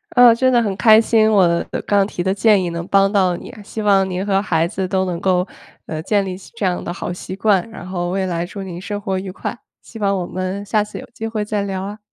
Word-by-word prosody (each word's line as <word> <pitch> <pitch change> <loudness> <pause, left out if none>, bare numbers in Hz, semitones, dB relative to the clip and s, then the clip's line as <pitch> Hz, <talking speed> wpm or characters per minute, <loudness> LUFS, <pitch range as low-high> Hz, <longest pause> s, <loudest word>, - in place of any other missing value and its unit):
嗯， 245 -2 +8
真 260 +2 +2
的 240 -2 +4
很 205 -4 -1
开 215 +3 +6
心 220 -1 +3
我 175 -4 +3 0.2
刚 200 -1 +3
提 175 - -4
的 190 0 +1
建 205 -1 +4
议 175 - -2
能 170 0 -4
帮 195 0 +3
到 185 -4 +2
你， - - -10
希 215 +1 -6
望 195 -2 +3
您 185 +2 -3
和 195 -1 +2
孩 165 -4 +1
子 190 0 -3
都 190 0 0
能 175 -2 -3
够， 185 0 +1 0.4
呃， 155 -1 -4
建 200 +4 +1
立 185 -1 -4
起 190 - -14
这 215 - -2
样 180 -1 -1
的 - - -4
好 175 0 -4
习 185 +1 -7
惯， 200 0 +2
然 185 -5 -9
后 175 -1 -3
未 190 +1 -1
来 170 -2 -2
祝 195 +2 -7
您 180 -2 -7
生 205 +1 -4
活 190 -2 -2
愉 190 -1 -6
快， 235 - -5 0.3
希 225 - -11
望 200 -1 +1
我 180 - -2
们 185 +3 -4
下 210 +1 +1
次 210 - -9
有 - - -8
机 225 -2 -5
会 215 -2 -3
再 210 -1 -1
聊 190 -1 -3
啊。 205 +2 -6
195 Hz, 280 characters per minute, -19 LUFS, 185-210 Hz, 0.4 s, 嗯